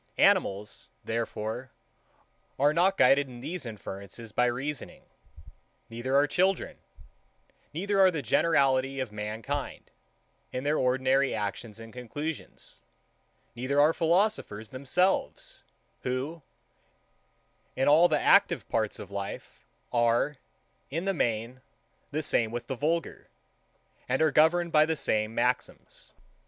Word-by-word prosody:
Animals, 100 +2 +1
therefore, 115 +2 -3 0.9
are 145 +2 +3
not 185 +4 +3
guided 135 +2 +5
in 125 -2 -11
these 155 +1 -5
inferences 105 +1 -8
by 125 +3 +2
reasoning: 135 +4 -4 0.9
Neither 120 +4 -2
are 140 +1 +5
children: 185 +5 0 0.9
Neither 195 +5 -1
are 190 -1 +7
the 160 -6 -3
generality 135 0 +2
of 130 -5 -3
mankind, 110 +7 -5 0.6
in 125 - -4
their 150 +2 +1
ordinary 130 +1 +2
actions 105 +1 -4
and 115 -1 -11
conclusions: 145 +5 -7 0.7
Neither 130 +4 0
are 150 +3 +5
philosophers 170 - 0
themselves, 175 +9 -1 0.4
who, 135 +6 -3 1.3
in 135 - +1
all 155 +4 +7
the - - +1
active - - +4
parts 110 -2 -1
of 100 - -10
life, 100 0 -7 0.3
are, 120 +4 +2 0.5
in 165 +6 -3
the 195 - +1
main, 120 - -2 0.5
the 155 +2 -2
same 115 -5 +1
with 120 +1 -5
the 135 - -4
vulgar, 160 +6 -2 0.8
and 130 - +1
are 160 -1 +3
governed 170 +2 +3
by 155 0 +5
the 160 - 0
same 110 -5 0
maxims. - - -2
130 Hz, 120 wpm, -28 LUFS, 115-155 Hz, 1.3 s, are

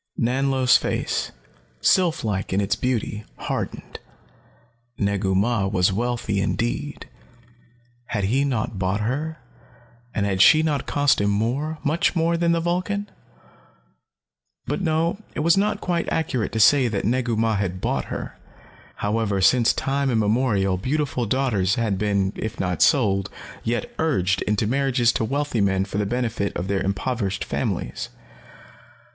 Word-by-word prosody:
Nanlo's 130 +1 +3
face, - - -2 0.5
sylph 175 - +2
like 100 -4 -2
in 95 - +1
its 100 +1 +1
beauty, 110 -3 -2
hardened. - - -5 1.0
Negu 100 -2 0
Mah 100 0 +1
was 95 -1 +2
wealthy 115 -2 -1
indeed. 120 +8 -2 1.0
Had 105 -3 -2
he 125 +8 +2
not 110 -7 -2
bought 95 +2 0
her, 150 +8 -2 0.8
and 100 - +1
had 95 -2 +1
she 155 +6 +7
not 150 -3 -1
cost 145 -6 +2
him 100 - +2
more, 125 +10 -1
much 155 +5 +1
more, 170 0 +2
than 170 0 +2
the 170 - +2
Vulcan? 185 +4 -2 1.5
But - - -2
no, 165 +2 0 0.2
it - - -1
was 170 +2 +4
not 205 +1 0
quite 175 -2 -1
accurate 130 - -1
to 110 - -1
say 130 +5 +6
that 105 -4 -2
Negu 120 +1 0
Mah 110 -1 +1
had 95 -2 -2
bought - - -1
her. - - -6 0.6
However, 105 -1 -1
since 120 +5 +4
time 140 0 -1
immemorial 105 -4 +1
beautiful 130 +2 -1
daughters 110 -6 +1
had 110 -6 -1
been, 100 -2 0
if 110 - -5
not 90 -3 -1
sold, 100 - +3 0.3
yet 115 -1 -2
urged 95 - +1
into 105 +1 +1
marriages 125 -1 +2
to - - -1
wealthy 140 -1 -1
men 95 -1 +1
for 100 +1 -4
the 105 - 0
benefit 115 -3 -2
of 85 - -3
their 100 -1 0
impoverished 100 0 -2
families. - - -3
115 Hz, 145 wpm, -23 LUFS, 100-140 Hz, 1.5 s, she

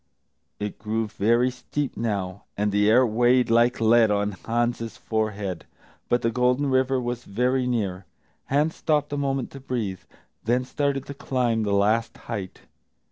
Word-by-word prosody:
It 105 0 -4
grew 110 +2 -1
very 115 +5 +2
steep 130 +3 -4
now, 100 -4 -3
and 105 0 +1
the 105 +1 +3
air 125 +4 +6
weighed 120 +1 +3
like 120 +2 +4
lead 115 0 +5
on 105 0 +1
Hans's 115 +2 -2
forehead, 105 -5 -3 0.4
but 120 - +2
the 115 - +2
Golden 125 +3 +1
River 130 0 +2
was 120 0 -3
very 125 +5 0
near. 100 -7 -2 0.4
Hans 150 +4 +1
stopped 150 -2 0
a - - -1
moment 135 -2 -1
to 135 - -9
breathe, 115 -8 -3 0.4
then 125 +3 +1
started 140 0 -1
to 140 - -7
climb 125 -4 0
the 105 -2 -1
last 110 +3 +2
height. 100 -6 -6
120 Hz, 155 wpm, -25 LUFS, 105-130 Hz, 0.4 s, air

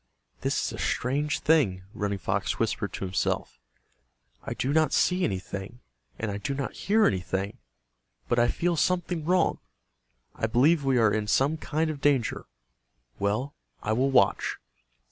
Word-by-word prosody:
"This - - 0
is - - -3
a - - -7
strange 145 +4 0
thing," 135 - +3
Running 100 -1 -2
Fox - - -1
whispered - - -1
to - - -4
himself. 95 0 -2 0.8
"I - - -5
do 135 +2 -1
not 155 -2 +3
see 180 0 +2
anything, 100 - -4 0.4
and 110 -2 -3
I 100 - -4
do 135 +7 -3
not 140 0 -3
hear 215 +2 +2
anything, 95 +1 -1 0.7
but 120 - +2
I 120 - +4
feel 170 +6 0
something 175 0 0
wrong. 180 +2 +2 0.7
I 110 - -1
believe 140 +7 +3
we 135 -2 +2
are 110 -3 +4
in 110 -1 -1
some 135 +8 +2
kind 155 0 -1
of 145 -2 -8
danger. 135 -5 +1 0.7
Well, 110 +8 -1 0.3
I 110 - 0
will 130 +4 +2
watch." 125 -7 +2
130 Hz, 155 wpm, -27 LUFS, 105-155 Hz, 0.8 s, I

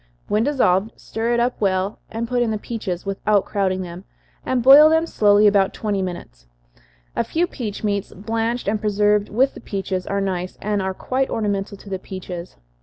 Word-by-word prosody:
When 210 +2 +1
dissolved, 220 -7 +2
stir 230 +2 -2
it - - +1
up 245 0 0
well, 190 0 0
and 230 +1 -4
put 245 0 0
in 240 - +1
the 215 - -1
peaches, 205 -5 -5
without 200 +1 +1
crowding 190 -2 -1
them, 175 +1 -8 0.4
and 255 -2 0
boil 285 +4 +9
them 320 +1 +3
slowly 210 -7 +4
about 200 -2 +3
twenty 205 -3 -1
minutes. - - -7 0.7
A - - +1
few 335 +2 0
peach 225 - -6
meats, 200 -2 -1
blanched 225 +4 -2
and 210 +1 0
preserved 210 0 +2
with 260 +6 +2
the - - -11
peaches, 190 -3 -3
are 200 - -1
nice, 185 -2 -3
and 210 -1 -1
are 190 0 -2
quite 265 +5 -1
ornamental 200 -2 -2
to 200 - -16
the 190 - -2
peaches. 180 -2 -8
205 Hz, 185 wpm, -21 LUFS, 190-230 Hz, 0.7 s, boil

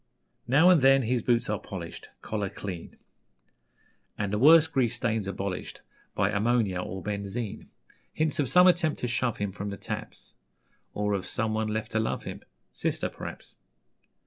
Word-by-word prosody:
Now 155 +9 +6
and 170 -5 +5
then 135 0 +6
his 120 +1 0
boots 120 +1 +1
are 105 -1 -1
polished, 85 -4 -8
Collar 105 -3 -2
clean, 90 -4 -7 1.2
And 100 -1 -2
the 105 - +1
worst 160 +4 +7
grease 120 -3 +1
stains 110 -4 -1
abolished 95 -1 -4 0.3
By 95 - +2
ammonia 105 -3 +1
or 95 0 -6
benzine: 105 +1 -4 0.4
Hints 155 -1 -1
of 140 -4 +1
some 180 +1 +7
attempt 175 -4 +3
to 125 - 0
shove 120 -1 0
him 100 -2 -2
From 100 +1 -5
the 100 - -6
taps, - - -7 0.6
Or 105 0 0
of 95 -2 -2
someone 110 0 -1
left 110 +1 -3
to 110 - +1
love 110 - -2
him - - -7 0.3
Sister, - - -2
p'r'aps. - - -9
110 Hz, 160 wpm, -28 LUFS, 100-125 Hz, 1.2 s, worst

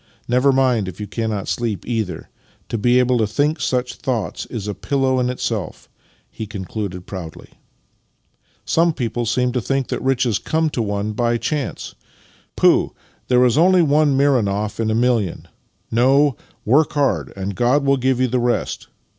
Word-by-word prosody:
Never 125 +3 +3
mind 130 -6 +2
if 95 +1 -8
you 105 - -4
cannot 110 -2 -3
sleep, 115 -6 -2
either. 110 -6 -3 0.4
To 115 - -2
be 120 +4 +3
able 125 -1 +3
to 110 - +2
think 145 +7 0
such 125 -2 -1
thoughts 115 - -3
is 110 -4 -6
a 105 - -2
pillow 130 +6 0
in 125 0 +1
itself," 115 -5 -4 0.4
he 110 - -6
concluded 95 -2 -5
proudly. 85 -5 -8 0.6
" - - -45 0.3
Some 165 0 +2
people 120 -3 -3
seem 125 +2 +1
to 125 0 -1
think 135 +3 -1
that - - -3
riches 130 -5 +1
come 160 -1 0
to 120 - -2
one 105 0 -2
by 120 +1 +1
chance. 145 +3 -3 0.6
Pooh! - - +3 0.3
There 125 0 +4
is 125 +4 +3
only 180 +1 +5
one 145 -2 +3
Mironoff 105 -8 +1
in 110 -1 0
a 110 - +1
million. 115 -6 0 0.4
No. 135 +4 +3 0.3
Work 145 +8 +3
hard, 145 -2 0
and 100 +1 -4
God 125 +6 +2
will 140 0 +3
give 130 0 +1
you 130 - +3
the 125 +1 0
rest. 120 0 -1
125 Hz, 170 wpm, -20 LUFS, 110-135 Hz, 0.6 s, only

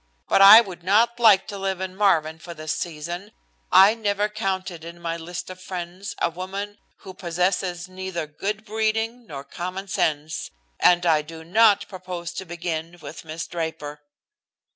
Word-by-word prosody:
But - - +4
I 200 +4 +11
would 190 -6 -9
not 225 +6 +3
like 215 -5 +6
to 200 - -6
live 190 -1 -2
in 190 0 -5
Marvin 160 -6 +2
for 170 +1 -9
this 155 -1 -3
season 175 +5 -5 0.4
I 195 +3 +8
never 210 -2 -1
counted 190 -5 -3
in 170 +1 -9
my 165 -1 -3
list 175 +2 -7
of 185 0 -11
friends 180 +2 -6
a 170 - +1
woman 195 +4 -6 0.2
who 190 -2 -10
possesses 180 0 -1
neither 185 -3 -5
good 200 +8 -4
breeding 225 +2 -1
nor 140 -2 -7
common 185 +6 -6
sense, 155 -4 -1 0.3
and 175 0 +4
I 160 -3 +4
do 160 +1 -11
not 205 +4 +4
propose 180 -2 -7
to 190 - -6
begin 170 -1 -5
with - - -9
Miss 160 +1 -6
Draper." 160 -3 -5
180 Hz, 165 wpm, -24 LUFS, 170-200 Hz, 0.4 s, I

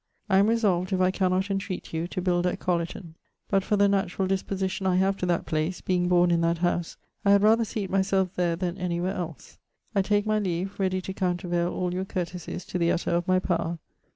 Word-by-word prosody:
I 190 - +6
am 200 - +4
resolved, 205 -5 +1
if 185 - +1
I 185 0 +3
cannot 190 +1 0
entreat 195 -3 -4
you, 165 +1 -1
to 185 0 -4
build 180 -1 +2
at 180 - -1
Colliton; 170 -1 -2 0.4
but 195 -1 +3
for 210 - +1
the 200 0 +5
naturall 195 -1 0
disposition 190 0 -1
I 185 - +3
have 190 +1 +2
to 180 - -2
that 175 -1 0
place, 155 +3 -1
being 180 -1 0
borne 175 0 +4
in 170 -1 +2
that 170 0 +2
house, 175 0 -1 0.3
I 200 - +2
had 200 0 +5
rather 225 +2 +5
seate 210 -3 -4
myselfe 190 -1 +1
there 175 -2 0
then 180 +1 -3
any 175 -1 -1
where 185 +2 -1
els; 170 -5 -7 0.3
I 200 - +3
take 205 +1 +1
my 215 0 +2
leave, 190 0 -3
readie 185 -1 0
to 190 - -5
countervaile 175 -2 -1
all 180 -1 -2
your 185 +1 -2
courtesies 180 -1 -5
to 180 - -3
the 170 0 +3
utter 170 - -1
of 170 0 0
my 185 0 +4
power. 170 -2 -1
185 Hz, 225 wpm, -26 LUFS, 175-195 Hz, 0.4 s, I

